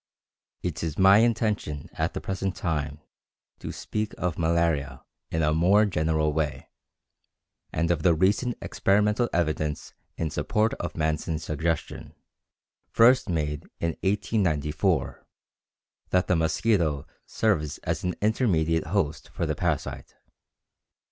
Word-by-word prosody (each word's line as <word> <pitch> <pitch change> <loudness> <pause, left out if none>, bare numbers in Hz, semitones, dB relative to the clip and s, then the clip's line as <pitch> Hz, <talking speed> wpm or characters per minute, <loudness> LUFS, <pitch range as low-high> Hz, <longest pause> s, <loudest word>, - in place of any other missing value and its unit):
It 85 -3 -3
is 80 -3 -3
my 95 +2 +7
intention 105 - 0
at - - -2
the - - -3
present 95 -1 -3
time 75 -3 -3 0.6
to - - -6
speak 105 0 -4
of 90 -3 -1
"Malaria" 80 -5 0 0.3
in 80 0 0
a 75 0 +2
more 95 +7 +4
general 80 -4 +1
way, 75 -1 -2 1.0
and 85 +2 0
of 85 -3 0
the 85 0 +4
recent 100 +8 +1
experimental 105 +4 +2
evidence 75 -3 -1 0.2
in 80 -2 -2
support 105 +9 0
of 85 - -5
Manson's 80 0 -1
suggestion, 80 +1 -3 0.7
first 120 -1 +5
made 75 -3 -2
in 85 - 0
1894, 90 -7 0 0.9
that 90 0 +2
the 90 - +2
mosquito 80 -2 +1 0.2
serves 80 -10 0
as - - -2
an 90 -1 -1
intermediate 85 -8 +1
host 75 +2 -1
for - - -3
the - - 0
parasite. - - -3
85 Hz, 120 wpm, -26 LUFS, 75-100 Hz, 1.0 s, my